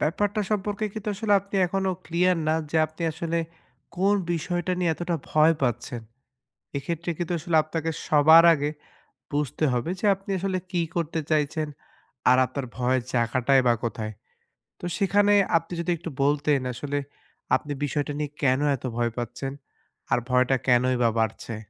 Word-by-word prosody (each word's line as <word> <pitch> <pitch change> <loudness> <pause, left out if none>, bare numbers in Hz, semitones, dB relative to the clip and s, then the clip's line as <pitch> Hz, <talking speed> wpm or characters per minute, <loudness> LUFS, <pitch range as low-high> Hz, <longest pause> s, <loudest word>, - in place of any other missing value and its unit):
ব্যাপারটা 205 +7 0
সম্পর্কে 210 0 -1
কিন্তু 215 0 -5
আসলে 210 +1 0
আপনি 200 +1 -13
এখনও 190 +1 -1
ক্লিয়ার 180 +1 +2
না 155 - +3 0.2
যে 165 - 0
আপনি 155 +2 -10
আসলে, 165 +1 -2 0.6
কোন 195 +3 +3 0.2
বিষয়টা 175 +2 -2
নিয়ে 175 -2 +1
এতটা 175 +1 -2
ভয় 155 +2 +5
পাচ্ছেন। 120 0 -1 0.8
এক্ষেত্রে 170 +4 -4
কিন্তু 175 0 -2
আসলে 170 0 -1
আপনাকে 160 +1 -3 0.2
সবার 160 +2 +7
আগে 145 -1 -1 0.6
বুঝতে 150 +1 -1
হবে 125 +6 -1
যে - - -2
আপনি 195 +1 -16
আসলে 190 0 -1
কী 175 -2 +1
করতে 165 -1 -1
চাইছেন, 155 0 +1 0.6
আর 125 - +6
আপনার 130 +1 -5
ভয়ের 130 0 +1
জায়গাটাই 130 +2 +3
বা 120 - +5
কোথায়। 110 -2 -3 0.7
তো - - -9
সেখানে 205 +1 +3 0.2
আপনি 165 +1 -3
যদি 170 - -2
একটু 170 +1 -6
বলতেন 145 0 +2
আসলে 145 +3 -3 0.6
আপনি 145 +2 -5
বিষয়টা 145 0 -1
নিয়ে 150 -1 -2
কেন 130 -1 +3 0.2
এত 130 - -20
ভয় 120 -1 +1
পাচ্ছেন? 120 +3 -4 0.6
আর - - +4
ভয়টা 125 +1 +3
কেনই 125 0 +3
বা 115 - +4
বাড়ছে? 110 +1 -2
155 Hz, 155 wpm, -25 LUFS, 130-175 Hz, 0.8 s, সবার